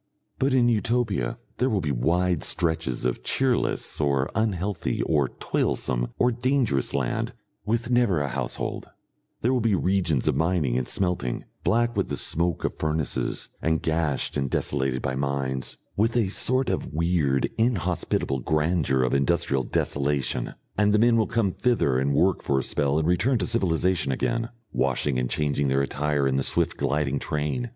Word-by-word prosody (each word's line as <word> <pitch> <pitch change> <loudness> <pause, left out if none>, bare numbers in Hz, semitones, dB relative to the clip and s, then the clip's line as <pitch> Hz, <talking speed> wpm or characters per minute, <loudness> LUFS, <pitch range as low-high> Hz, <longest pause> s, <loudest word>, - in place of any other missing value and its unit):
But 135 0 +2
in 120 -2 +4
Utopia 110 - 0 0.2
there 130 +2 +1
will 105 -5 +1
be 75 -5 -1
wide 85 +6 +1
stretches 80 -8 0
of 60 - -1
cheerless 130 -10 0
or 70 -2 +1
unhealthy 100 -3 -1
or 75 -4 +1
toilsome - - 0
or 125 - +3
dangerous 120 - 0
land 65 -3 -1 0.3
with 115 +3 0
never 120 -9 +3
a 70 - -1
household; - - -3 0.5
there 125 +3 +2
will 125 - +1
be 110 -3 +2
regions 90 -7 +1
of - - +3
mining 80 -7 +1
and 60 -1 -1
smelting, 90 -10 0 0.2
black 120 +1 +2
with - - 0
the - - -2
smoke 85 0 +1
of - - -1
furnaces 80 -1 -1
and 80 -1 0
gashed 80 -3 0
and 70 -2 -1
desolated 65 -1 -1
by 65 - -1
mines, 65 -1 -2 0.2
with 115 +4 +1
a 110 -5 +2
sort 130 +5 +1
of - - -3
weird 80 -4 +1
inhospitable 90 - 0
grandeur 75 -2 +1
of 65 - 0
industrial 70 0 +1
desolation, 70 0 -1 0.2
and 105 0 +4
the - - +5
men 115 +2 +4
will 110 -2 +2
come 110 -5 +1
thither 90 - +1
and 70 +1 +1
work 95 +5 +2
for 70 - 0
a 65 - +1
spell 70 +2 0
and 80 0 +1
return 115 +9 +2
to 95 - -1
civilisation 90 -6 +1
again, 115 - -1 0.2
washing 65 0 0
and 60 -1 -1
changing 70 -2 0
their 70 +1 +2
attire 70 0 0
in 65 0 +1
the - - +1
swift - - 0
gliding 70 0 0
train. 75 +12 -2
80 Hz, 165 wpm, -25 LUFS, 70-105 Hz, 0.5 s, the